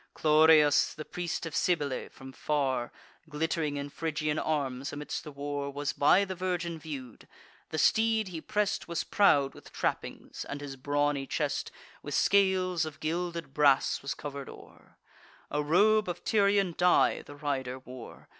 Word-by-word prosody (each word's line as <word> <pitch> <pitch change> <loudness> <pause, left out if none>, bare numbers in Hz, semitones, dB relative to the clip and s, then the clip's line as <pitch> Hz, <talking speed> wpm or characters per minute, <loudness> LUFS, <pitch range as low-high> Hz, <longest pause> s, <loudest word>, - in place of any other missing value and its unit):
Chloreus, 155 -1 +5
the 155 - -7
priest 175 -1 -4
of 165 - -5
Cybele, 145 -7 0
from 130 0 -12
far, 135 -5 -1 0.4
Glitt'ring 155 -1 -1
in 140 0 -5
Phrygian 155 -1 -2
arms 140 -2 -2
amidst 145 0 -5
the 150 - -8
war, 140 0 -4
Was 145 +1 -3
by 185 +7 +4
the 190 - -4
virgin 175 -2 -3
view'd. 140 -7 -8 0.4
The 155 - -4
steed 220 +7 +3
he 165 -3 -6
press'd 210 +3 -1
Was 170 -1 -2
proud 145 -9 +3
with - - -14
trappings, - - -4
and 140 - -6
his 145 -2 -7
brawny 145 +1 0
chest - - -2 0.3
With - - -4
scales 190 -3 +3
of 155 -2 -6
gilded 170 -1 -3
brass 140 -3 +3
was 140 - -4
cover'd 140 -2 -7
o'er; - - -15 0.5
A 150 - 0
robe 205 +7 +3
of 175 0 -5
Tyrian 200 -3 +2
dye 180 0 +3
the 145 - -12
rider 135 -3 -3
wore. 130 -2 -11
150 Hz, 155 wpm, -29 LUFS, 140-175 Hz, 0.5 s, Chloreus